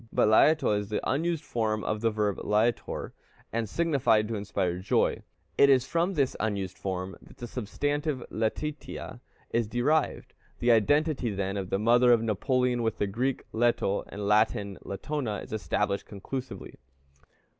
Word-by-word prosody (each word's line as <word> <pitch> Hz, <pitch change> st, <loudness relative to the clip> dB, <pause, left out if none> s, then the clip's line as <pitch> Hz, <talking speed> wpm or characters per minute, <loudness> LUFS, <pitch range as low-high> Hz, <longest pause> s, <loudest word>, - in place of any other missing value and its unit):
But -, -, +3 dB
Læto 150 Hz, +1 st, +5 dB
is 105 Hz, -1 st, -3 dB
the 105 Hz, -, -1 dB
unused 165 Hz, +3 st, 0 dB
form 110 Hz, -4 st, -1 dB
of 110 Hz, 0 st, -2 dB
the 115 Hz, -, +3 dB
verb 105 Hz, -2 st, -1 dB
lætor, 110 Hz, +3 st, 0 dB, 0.4 s
and 115 Hz, -2 st, -1 dB
signified 135 Hz, -10 st, +2 dB
to 115 Hz, -, -2 dB
inspire 100 Hz, -3 st, -2 dB
joy; 95 Hz, -, +1 dB, 0.4 s
it 140 Hz, -, +7 dB
is 130 Hz, -2 st, +5 dB
from 170 Hz, +6 st, 0 dB
this 140 Hz, -4 st, +1 dB
unused 100 Hz, -3 st, -2 dB
form 95 Hz, 0 st, -4 dB
that -, -, -17 dB
the 120 Hz, -, -6 dB
substantive 145 Hz, +4 st, -2 dB
Letitia 145 Hz, +7 st, -4 dB, 0.3 s
is 115 Hz, -2 st, +1 dB
derived. 135 Hz, +7 st, 0 dB, 0.2 s
The 120 Hz, -, +3 dB
identity, 140 Hz, +4 st, +2 dB
then, 100 Hz, -1 st, -2 dB
of 95 Hz, -2 st, -3 dB
the -, -, +1 dB
mother 120 Hz, +4 st, +5 dB
of 115 Hz, -2 st, +4 dB
Napoleon 125 Hz, +3 st, +1 dB
with 115 Hz, -1 st, -1 dB
the -, -, +1 dB
Greek 125 Hz, +7 st, -1 dB
Leto 115 Hz, -3 st, +1 dB
and 100 Hz, -, -7 dB
the -, -, -3 dB
Latin 105 Hz, -1 st, +2 dB
Latona, 120 Hz, +2 st, -3 dB
is -, -, -8 dB
established 105 Hz, -2 st, -1 dB
conclusively. 110 Hz, +1 st, -7 dB
115 Hz, 155 wpm, -28 LUFS, 105-130 Hz, 0.4 s, it